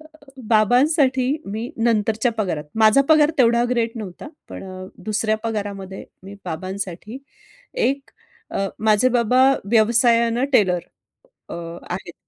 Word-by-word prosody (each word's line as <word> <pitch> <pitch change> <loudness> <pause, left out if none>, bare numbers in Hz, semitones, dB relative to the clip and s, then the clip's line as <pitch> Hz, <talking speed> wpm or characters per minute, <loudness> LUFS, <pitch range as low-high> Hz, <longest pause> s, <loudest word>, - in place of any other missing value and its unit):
अ, 310 - -16 0.4
बाबांसाठी 255 - +3 0.2
मी 220 +5 -5
नंतरच्या 225 0 +1
पगारात, 175 -8 -2
माझा 220 +4 +5
पगार 310 -1 +5
तेवढा 235 -1 +4
ग्रेट 235 -2 0
नव्हता. 210 +4 -8 0.2
पण - - -9 0.4
दुसऱ्या 215 0 0
पगारामध्ये 200 -3 -5 0.2
मी 195 +1 -10
बाबांसाठी 190 +6 -6 0.7
एक 275 +1 -2 0.4
अ, 195 - -2
माझे 215 +3 +3
बाबा 250 +1 +2 0.3
व्यवसायानं 235 +1 +3
टेलर 185 -7 +3 0.7
अ, - - -7
आहेत. 170 +1 -7
220 Hz, 110 wpm, -21 LUFS, 200-245 Hz, 0.7 s, माझा